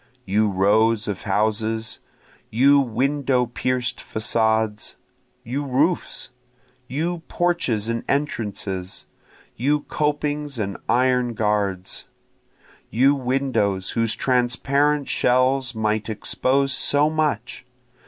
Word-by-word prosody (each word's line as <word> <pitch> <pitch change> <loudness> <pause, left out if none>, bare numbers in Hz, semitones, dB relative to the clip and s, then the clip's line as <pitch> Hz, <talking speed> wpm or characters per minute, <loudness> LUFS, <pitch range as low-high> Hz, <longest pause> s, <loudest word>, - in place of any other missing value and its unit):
You 105 +2 +2
rows 105 +3 +2
of 100 -3 -3
houses! 110 +2 -1 0.5
you 140 +5 +5
window 135 +1 +1
pierc'd 125 +1 -2
facades! 110 -1 0 0.5
you 135 +5 -3
roofs! 145 +6 0 0.6
You 165 +7 -2
porches 170 -12 0
and 115 0 -2
entrances! 100 -9 -2 0.5
you 145 +5 +1
copings 150 -1 -2
and 100 -3 -3
iron 125 -1 +2
guards! 100 -3 -1 0.8
You 130 +5 +4
windows 125 -8 0
whose 115 -2 0
transparent 135 +3 +1
shells 130 0 +2
might 110 0 -1
expose 135 +5 0
so 145 +3 +3
much! 150 -8 -1
125 Hz, 95 wpm, -22 LUFS, 110-140 Hz, 0.8 s, you